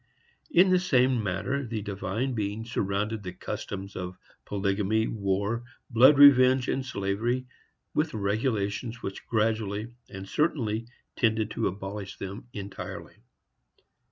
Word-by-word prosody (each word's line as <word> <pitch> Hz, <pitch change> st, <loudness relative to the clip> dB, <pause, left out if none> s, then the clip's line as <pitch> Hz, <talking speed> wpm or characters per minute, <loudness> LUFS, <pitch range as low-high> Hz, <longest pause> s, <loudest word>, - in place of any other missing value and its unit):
In 190 Hz, -, +5 dB
the 185 Hz, -, +5 dB
same 130 Hz, -8 st, +3 dB
manner 105 Hz, +8 st, -1 dB
the 115 Hz, -4 st, -4 dB
Divine 100 Hz, +6 st, -2 dB
Being 105 Hz, 0 st, -2 dB
surrounded 105 Hz, -1 st, -1 dB
the 90 Hz, -2 st, -6 dB
customs 100 Hz, +1 st, -6 dB
of 90 Hz, 0 st, -5 dB, 0.3 s
polygamy, 100 Hz, +2 st, 0 dB
war, 100 Hz, +2 st, -1 dB, 0.3 s
blood 130 Hz, +5 st, +7 dB
revenge 130 Hz, -2 st, +7 dB
and 135 Hz, -, 0 dB
slavery, 115 Hz, +3 st, -1 dB, 0.5 s
with 150 Hz, -3 st, 0 dB
regulations 110 Hz, +2 st, -1 dB
which 95 Hz, -, -6 dB
gradually 110 Hz, 0 st, 0 dB, 0.2 s
and 95 Hz, -1 st, -8 dB
certainly 115 Hz, -6 st, 0 dB, 0.3 s
tended 110 Hz, -2 st, +1 dB
to -, -, 0 dB
abolish 95 Hz, +1 st, -5 dB
them 100 Hz, +4 st, -7 dB
entirely. 100 Hz, -2 st, -7 dB
110 Hz, 120 wpm, -28 LUFS, 100-125 Hz, 0.5 s, blood